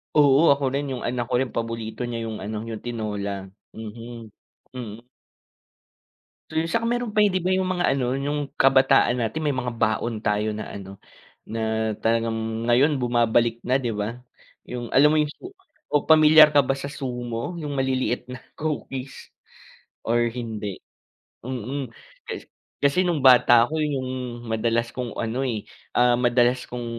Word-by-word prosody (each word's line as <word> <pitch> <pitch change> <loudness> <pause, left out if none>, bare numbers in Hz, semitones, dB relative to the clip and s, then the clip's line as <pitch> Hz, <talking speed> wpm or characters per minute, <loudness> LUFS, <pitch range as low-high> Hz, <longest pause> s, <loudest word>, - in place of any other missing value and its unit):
Oo, 145 +1 +6
ako 140 0 +1
rin 140 -1 -2
yung 125 - -4
anak 125 0 -1
ko 125 - +3
rin 130 -3 -3
paborito 115 0 -4
niya 115 -1 -4
yung 110 -3 -6
ano, 110 +2 -5
yung 110 -2 -6
tinola, 105 -4 -4 0.2
mhm, 115 +1 -9 0.5
mm. 115 -1 -8 1.4
Tsaka 165 +9 -1
meron 240 -2 -1
pa 210 - +3
'di 195 -3 +3
'ba 185 - +1
yung 185 0 +1
mga 180 -1 0
ano 130 -1 -1
yung 145 0 -2
kabataan 130 -2 +4
natin 115 +7 -2
may 145 - +1
mga 125 -1 -2
baon 110 +1 0
tayo 105 +1 +1
na 110 - -6
ano, 100 0 -9 0.5
na 110 0 -1
talagang 115 0 -1
ngayon 135 +5 +3
bumabalik 120 -1 +1
na 130 +2 +1
'di 120 -4 -2
'ba. 105 +3 -3 0.5
Yung 120 -1 -6
alam 145 +3 +5
mo - - +3
yung 150 - -1 0.6
o 145 - +1
pamilyar 155 -1 +7
ka 145 - +7
ba 130 - 0
sa 135 +1 -5
sumo 125 +2 -5
yung 145 -3 -4
maliliit 130 -2 0
na 130 - -7 0.2
cookies 140 -4 -5 0.8
or 120 +1 +2
hindi, 110 -4 -5 0.7
mm. 130 +2 -4 1.0
Kasi 140 +5 +3
nung 170 -6 0
bata 120 -2 +7
ako 155 +5 -3
yun 150 -2 0
yung 130 -1 -3 0.3
madalas 115 +1 -1
kong 125 -4 -5
ano, 115 +3 -2
eh, 115 -6 -2 0.3
ah, 120 0 +4
madalas 120 +1 +2
kong 120 -1 -5
120 Hz, 155 wpm, -24 LUFS, 115-140 Hz, 1.4 s, pamilyar